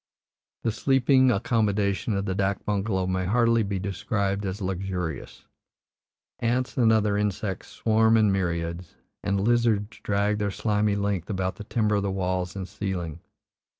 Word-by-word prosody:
The 115 Hz, -, +1 dB
sleeping 130 Hz, +2 st, +3 dB
accommodation 105 Hz, -2 st, +1 dB
of 100 Hz, 0 st, -1 dB
the 95 Hz, -, -1 dB
dak 95 Hz, 0 st, -1 dB
bungalow 100 Hz, -2 st, 0 dB
may 95 Hz, 0 st, -1 dB
hardly 115 Hz, +3 st, +3 dB
be 100 Hz, -2 st, -2 dB
described 100 Hz, +1 st, -2 dB
as 95 Hz, +2 st, -4 dB
luxurious; 95 Hz, -3 st, -4 dB, 0.9 s
ants 120 Hz, +2 st, 0 dB
and 115 Hz, -4 st, +4 dB
other 105 Hz, -2 st, +2 dB
insects 105 Hz, -1 st, -2 dB
swarm 110 Hz, 0 st, +3 dB
in 105 Hz, -2 st, +4 dB
myriads, 85 Hz, -2 st, -2 dB, 0.3 s
and 100 Hz, -1 st, 0 dB
lizards 115 Hz, -1 st, +1 dB
drag 105 Hz, +1 st, 0 dB
their 105 Hz, -1 st, 0 dB
slimy 105 Hz, 0 st, 0 dB
length 100 Hz, -2 st, -1 dB
about 95 Hz, -2 st, -2 dB
the 105 Hz, -, -8 dB
timber 105 Hz, -2 st, +1 dB
of -, -, +1 dB
the 100 Hz, -, -1 dB
walls 95 Hz, -1 st, -2 dB
and 95 Hz, -2 st, -5 dB
ceiling. 90 Hz, -5 st, -4 dB
100 Hz, 150 wpm, -26 LUFS, 95-110 Hz, 0.9 s, and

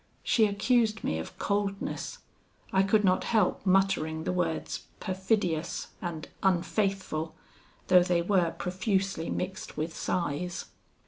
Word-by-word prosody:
She 220 Hz, -2 st, +4 dB
accused 220 Hz, +2 st, +2 dB
me 80 Hz, -, 0 dB
of 80 Hz, -, -7 dB
coldness. 200 Hz, -1 st, -2 dB, 0.6 s
I 190 Hz, -, +5 dB
could 210 Hz, +2 st, +3 dB
not 185 Hz, -2 st, +3 dB
help 215 Hz, -5 st, +2 dB
muttering 185 Hz, -5 st, +2 dB
the -, -, -1 dB
words 170 Hz, -3 st, -2 dB
perfidious 185 Hz, -4 st, -1 dB
and 170 Hz, -4 st, -4 dB
unfaithful, 190 Hz, -3 st, 0 dB, 0.5 s
though 180 Hz, -1 st, +7 dB
they 175 Hz, -1 st, +2 dB
were 180 Hz, -2 st, +3 dB
profusely 190 Hz, 0 st, -1 dB
mixed 180 Hz, -3 st, -4 dB
with 160 Hz, +2 st, -2 dB
sighs. 175 Hz, +1 st, -2 dB
185 Hz, 120 wpm, -29 LUFS, 170-195 Hz, 0.6 s, though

